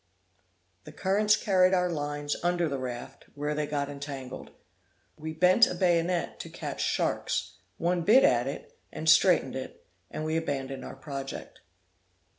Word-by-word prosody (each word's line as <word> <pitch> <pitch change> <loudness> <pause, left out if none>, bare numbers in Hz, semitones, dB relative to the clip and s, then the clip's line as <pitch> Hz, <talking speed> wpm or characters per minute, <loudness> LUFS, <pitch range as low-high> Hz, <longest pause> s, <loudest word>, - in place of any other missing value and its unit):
The - - -9
currents 210 +2 +2
carried 185 -2 +3
our 180 0 +2
lines 145 -1 -2
under 175 -1 +1
the 140 -3 -3
raft, 125 +1 -7
where 145 +1 -2
they 150 0 -2
got 145 -1 -1
entangled. 140 -2 -7 0.7
We 160 +1 -6
bent 180 +8 +5
a - - -4
bayonet 175 -1 +1
to - - -7
catch - - -5
sharks, - - -1 0.2
one 175 +1 0
bit 220 +10 +6
at 120 +1 +3
it, 140 - -7 0.2
and 160 - -6
straitened 155 -3 +5
it, 130 - -7 0.2
and 155 - -5
we 160 +1 0
abandoned 135 -4 -3
our - - -8
project. 135 0 -7
155 Hz, 150 wpm, -28 LUFS, 140-180 Hz, 0.7 s, bit